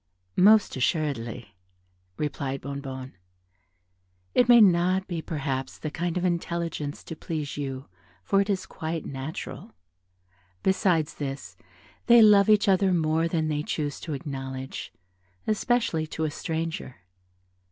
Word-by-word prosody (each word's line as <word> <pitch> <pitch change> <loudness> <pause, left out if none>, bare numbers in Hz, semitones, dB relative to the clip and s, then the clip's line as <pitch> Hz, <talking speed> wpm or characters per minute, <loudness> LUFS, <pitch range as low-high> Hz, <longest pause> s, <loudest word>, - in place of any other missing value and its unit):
"Most 210 +3 +5
assuredly," 125 - -2 0.6
replied 140 -2 -3
Bonnebonne, 135 -1 -6 1.2
"it 245 -1 +4
may 240 -1 +9
not 185 -1 +4
be 170 -3 -3
perhaps 135 -4 -3
the 155 - -5
kind 175 +2 -2
of 180 - 0
intelligence 170 -4 -2
to 160 - -7
please 155 -3 -4
you, 135 -1 -5 0.4
for 195 0 +3
it 200 - -2
is 190 -2 0
quite 160 -3 -5
natural. 135 -4 -6 0.9
Besides 180 -5 +2
this, 135 -1 -6 0.5
they 235 -1 +8
love 205 -1 +6
each 210 -1 +5
other 190 0 +4
more 160 -1 +2
than 160 -2 0
they 150 -1 -1
choose 150 -1 -3
to 160 - -5
acknowledge, 135 -1 -6 0.5
especially 215 -7 +1
to 160 - -4
a 155 - 0
stranger." 160 -4 -4
160 Hz, 125 wpm, -26 LUFS, 140-185 Hz, 1.2 s, may